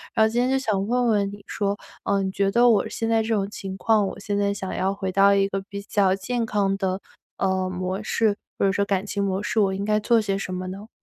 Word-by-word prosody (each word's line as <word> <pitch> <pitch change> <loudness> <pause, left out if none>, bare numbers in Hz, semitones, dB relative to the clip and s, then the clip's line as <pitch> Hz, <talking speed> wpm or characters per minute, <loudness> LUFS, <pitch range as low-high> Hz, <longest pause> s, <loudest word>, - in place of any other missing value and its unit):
然 220 - +5
后 - - +2
今 240 - 0
天 255 - +1
就 270 - +2
想 205 -6 0
问 245 0 +1
问 205 -3 +2
你 205 0 -11
说， 200 -1 -1 0.3
呃， 200 -1 +2
你 190 - -2
觉 195 0 +1
得 240 +2 +5
我 210 -4 +3
现 225 0 -3
在 225 -1 +3
这 225 - -5
种 200 -1 -1
情 195 -2 -6
况， 210 0 +2
我 - - -7
现 205 0 -2
在 200 0 +1
想 190 -2 -5
要 195 +1 0
回 190 -1 -3
到 200 +1 +5
一 195 0 +3
个 195 0 -3
比 200 0 -5
较 195 -2 +2
健 235 +4 -2
康 200 -2 0
的， 190 -1 -2 0.4
呃， 190 -1 0
模 185 +3 -3
式， 215 -2 +1 0.2
或 - - +3
者 195 - +3
说 200 +1 +1
感 195 -1 0
情 200 -1 -2
模 195 0 -1
式， 220 - 0
我 195 -2 +3
应 200 +1 -3
该 210 0 +2
做 230 +2 +3
些 195 -2 -1
什 185 -1 -4
么 185 0 -4
呢？ 200 +4 -8
200 Hz, 290 characters per minute, -24 LUFS, 195-215 Hz, 0.4 s, 然